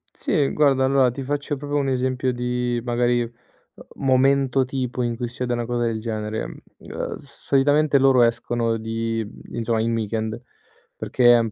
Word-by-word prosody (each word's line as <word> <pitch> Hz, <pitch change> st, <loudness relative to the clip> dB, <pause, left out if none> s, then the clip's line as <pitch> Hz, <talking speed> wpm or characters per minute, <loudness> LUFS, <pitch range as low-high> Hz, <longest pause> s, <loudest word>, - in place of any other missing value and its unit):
Sì, 150 Hz, -8 st, +1 dB
guarda 135 Hz, -3 st, +3 dB
allora 130 Hz, -2 st, +3 dB
ti 135 Hz, -, -6 dB
faccio 145 Hz, +2 st, -2 dB
proprio 145 Hz, +1 st, -3 dB
un 140 Hz, -1 st, 0 dB
esempio 130 Hz, 0 st, 0 dB
di, 125 Hz, -1 st, -1 dB
magari, 120 Hz, 0 st, +1 dB
uhm, 120 Hz, 0 st, -4 dB, 0.7 s
momento 135 Hz, 0 st, +3 dB
tipo 130 Hz, -1 st, -3 dB
in 120 Hz, -1 st, -1 dB
cui 120 Hz, +1 st, -3 dB
succede 125 Hz, 0 st, -3 dB
una 120 Hz, 0 st, -2 dB
cosa 120 Hz, 0 st, -1 dB
del 115 Hz, -2 st, -1 dB
genere, 110 Hz, -1 st, -3 dB
mhmm, -, -, -10 dB, 0.2 s
uhm, -, -, -5 dB
solitamente 140 Hz, +1 st, +1 dB
loro 130 Hz, -2 st, +5 dB
escono 115 Hz, 0 st, 0 dB
di 115 Hz, 0 st, -2 dB
mhmm, 105 Hz, -, -12 dB
insomma 115 Hz, -1 st, 0 dB
in 115 Hz, +1 st, 0 dB
weekend, 110 Hz, +1 st, -2 dB, 0.5 s
perché 120 Hz, -1 st, +4 dB
è 120 Hz, -, +6 dB
un 115 Hz, -2 st, -1 dB
125 Hz, 170 wpm, -23 LUFS, 115-135 Hz, 0.7 s, è